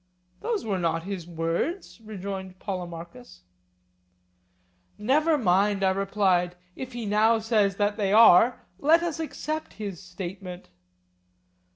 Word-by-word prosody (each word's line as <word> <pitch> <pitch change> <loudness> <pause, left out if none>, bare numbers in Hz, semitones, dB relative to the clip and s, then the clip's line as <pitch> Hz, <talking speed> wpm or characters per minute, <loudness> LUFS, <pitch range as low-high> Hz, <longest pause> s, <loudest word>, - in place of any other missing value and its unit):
Those 455 - -2
were 195 -4 -1
not 165 -1 0
his 185 -3 -6
words, 170 - -3
rejoined 190 -3 -6
Polemarchus. 170 - -7 1.6
Never 300 +8 +2
mind, 200 -2 +2
I 190 - +4
replied, 190 -2 +1 0.2
if 260 -1 -7
he 240 -2 -5
now 215 +2 +3
says 215 -3 +1
that 205 +1 0
they 200 -3 0
are, 225 +2 +6
let 325 +4 +4
us 335 -2 -3
accept 310 0 -4
his 200 -5 -6
statement. 180 0 -8
200 Hz, 115 wpm, -26 LUFS, 180-225 Hz, 1.6 s, are